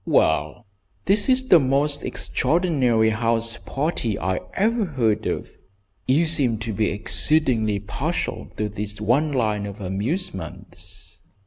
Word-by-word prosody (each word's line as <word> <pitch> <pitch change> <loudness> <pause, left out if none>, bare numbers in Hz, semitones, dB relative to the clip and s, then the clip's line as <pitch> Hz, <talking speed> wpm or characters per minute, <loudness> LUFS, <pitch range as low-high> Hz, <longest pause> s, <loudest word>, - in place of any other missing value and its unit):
"Well, 80 +6 +1 0.4
this 205 +4 +2
is 260 0 +2
the 175 - +8
most 140 +2 0
extraordinary 130 -8 +1
house 115 +1 0
party 135 - -2
I 95 +2 -1 0.2
ever 225 +3 +1
heard 115 - 0
of. - - -4 0.6
You 145 +6 +3
seem 140 -8 +2
to 110 0 -4
be 105 +1 0
exceedingly 115 -1 +2
partial 100 - -3
to 105 - -1
this 105 0 -6
one 130 +8 +1
line 105 -6 -1
of 100 +1 -9
amusements." 100 - -6
115 Hz, 125 wpm, -23 LUFS, 105-155 Hz, 0.6 s, the